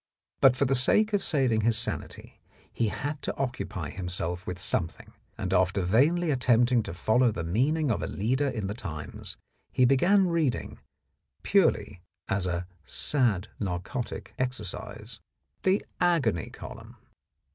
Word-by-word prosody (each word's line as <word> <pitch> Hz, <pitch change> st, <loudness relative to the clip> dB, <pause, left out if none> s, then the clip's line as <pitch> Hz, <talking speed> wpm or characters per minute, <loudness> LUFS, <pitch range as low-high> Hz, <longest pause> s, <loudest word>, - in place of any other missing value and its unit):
But 130 Hz, -2 st, +6 dB
for 140 Hz, -, +1 dB
the 135 Hz, -, +1 dB
sake 210 Hz, -, +4 dB
of 205 Hz, -, +2 dB
saving 130 Hz, -, +2 dB
his 115 Hz, +1 st, +2 dB
sanity 115 Hz, -, -4 dB, 0.3 s
he 115 Hz, -, 0 dB
had 145 Hz, +6 st, -4 dB
to -, -, -3 dB
occupy 100 Hz, -, -3 dB
himself 90 Hz, -1 st, -4 dB
with 90 Hz, -, -3 dB
something, 85 Hz, -1 st, -2 dB, 0.2 s
and 95 Hz, 0 st, -2 dB
after 95 Hz, +1 st, +2 dB
vainly 150 Hz, -, +3 dB
at 130 Hz, -3 st, -1 dB
tempting 120 Hz, 0 st, +4 dB
to 95 Hz, -, -6 dB
follow 115 Hz, +6 st, +3 dB
the 85 Hz, -, -4 dB
meaning 135 Hz, -, +1 dB
of 110 Hz, -, -1 dB
a -, -, -2 dB
leader 130 Hz, +8 st, 0 dB
in 115 Hz, -7 st, -3 dB
the 100 Hz, -, -2 dB
Times, 80 Hz, -9 st, -7 dB, 0.3 s
he 130 Hz, -1 st, +4 dB
began 180 Hz, +10 st, +4 dB
reading, 160 Hz, -8 st, -1 dB, 0.6 s
purely 90 Hz, -, +2 dB, 0.3 s
as 95 Hz, -1 st, 0 dB
a 90 Hz, 0 st, -2 dB, 0.2 s
"sad 110 Hz, -, 0 dB
narcotic 95 Hz, +6 st, -4 dB
exercise," 110 Hz, -2 st, -5 dB, 0.4 s
the 190 Hz, +2 st, +2 dB
Agony 145 Hz, -, +1 dB
column. -, -, -10 dB
115 Hz, 145 wpm, -28 LUFS, 95-135 Hz, 0.6 s, But